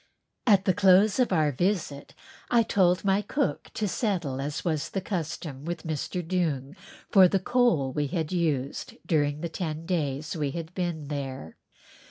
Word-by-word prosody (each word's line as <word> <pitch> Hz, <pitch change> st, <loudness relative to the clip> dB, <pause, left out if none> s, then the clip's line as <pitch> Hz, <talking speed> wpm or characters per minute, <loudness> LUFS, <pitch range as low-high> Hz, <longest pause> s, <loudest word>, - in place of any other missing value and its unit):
At 195 Hz, -4 st, +5 dB
the 185 Hz, -, +4 dB
close 195 Hz, +4 st, +5 dB
of 250 Hz, -, +2 dB
our 155 Hz, -4 st, +3 dB
visit 165 Hz, -2 st, -2 dB, 0.3 s
I 235 Hz, -1 st, +4 dB
told 185 Hz, -3 st, +2 dB
my 195 Hz, +1 st, +3 dB
cook 275 Hz, +6 st, -2 dB
to 215 Hz, -, 0 dB
settle 175 Hz, -, -1 dB
as 145 Hz, +4 st, -4 dB
was 155 Hz, -4 st, -1 dB
the 195 Hz, -, -2 dB
custom 160 Hz, -6 st, -4 dB
with 175 Hz, +2 st, -4 dB
Mr. 160 Hz, +2 st, -3 dB
Doong 160 Hz, -5 st, -1 dB, 0.4 s
for 190 Hz, -2 st, +8 dB
the 195 Hz, -, +1 dB
coal 185 Hz, -, +2 dB
we 145 Hz, +1 st, 0 dB
had 160 Hz, +2 st, -2 dB
used 150 Hz, -7 st, -1 dB
during 145 Hz, -2 st, +1 dB
the 170 Hz, -, -2 dB
ten 160 Hz, -1 st, -4 dB
days 155 Hz, -3 st, -2 dB
we 150 Hz, -3 st, -1 dB
had 165 Hz, +1 st, -6 dB
been 170 Hz, -5 st, -3 dB
there. 135 Hz, -, -5 dB
170 Hz, 165 wpm, -27 LUFS, 145-190 Hz, 0.4 s, for